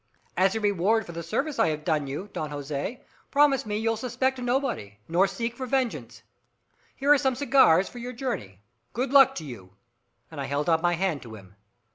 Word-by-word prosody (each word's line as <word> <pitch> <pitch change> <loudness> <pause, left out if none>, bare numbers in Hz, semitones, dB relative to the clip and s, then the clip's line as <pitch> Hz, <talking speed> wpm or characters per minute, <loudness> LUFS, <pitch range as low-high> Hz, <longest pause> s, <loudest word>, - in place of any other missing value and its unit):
"As 190 +2 +2
a - - 0
reward 205 +1 +1
for - - -8
the 170 0 -6
service 270 - -2
I 225 - +4
have 155 -1 -3
done 155 -4 0
you, 145 +9 -5
Don 155 - -3
Jose, 145 - -5 0.3
promise 280 -4 +3
me 210 0 -1
you'll 225 +1 0
suspect 255 +2 -1
nobody 245 - -2
nor 180 +4 +3
seek 230 +3 -4
for 260 0 -5
vengeance. 260 -2 -2 0.7
Here 285 +2 +4
are 290 - +3
some 265 -2 +1
cigars 260 - +4
for 245 - -10
your 245 +1 -5
journey. 230 - -5 0.3
Good 255 +3 -2
luck 270 -1 +7
to 160 - -5
you." 100 -8 -10 0.6
And - - -6
I - - -3
held 145 +4 -1
out 160 0 +3
my 175 0 +2
hand 175 -4 -1
to 115 -2 -10
him. 100 -2 -15
205 Hz, 200 wpm, -26 LUFS, 155-255 Hz, 0.7 s, luck